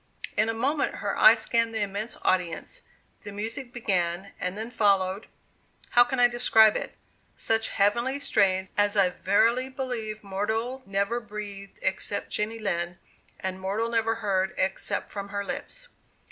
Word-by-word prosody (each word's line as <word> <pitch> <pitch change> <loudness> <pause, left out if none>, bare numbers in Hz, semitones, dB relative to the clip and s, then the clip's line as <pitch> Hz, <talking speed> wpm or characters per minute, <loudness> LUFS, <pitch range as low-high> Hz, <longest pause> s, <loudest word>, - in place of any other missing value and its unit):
In 220 - +2
a - - 0
moment 275 +6 0
her - - -3
eye - - +8
scanned 230 -1 0
the 220 - 0
immense 205 +3 -4
audience, 185 - 0 0.4
the 205 - -8
music 225 +5 -5
began 190 -5 -1
and 180 +2 -3
then 225 +2 -5
followed 200 -3 +1 0.6
how 240 - +7
can 245 +1 -3
I 245 - +7
describe 235 -3 +5
it? - - -4 0.4
such 225 0 +1
heavenly 235 +7 +1
strains 190 -9 +1
as 205 0 +2
I 185 -2 +4
verily 230 +8 +2
believe 235 -5 -4
mortal 220 +6 -2
never 200 +4 0
breathed 205 -3 -8
except 190 +1 +1
Jenny 215 +2 -1
Lind, 175 -5 -2 0.4
and 190 0 -4
mortal 205 +5 -1
never 225 -1 +1
heard 195 -4 -1
except 190 +1 -1
from 200 -1 -6
her 200 0 -3
lips. - - -6
210 Hz, 150 wpm, -27 LUFS, 195-235 Hz, 0.6 s, eye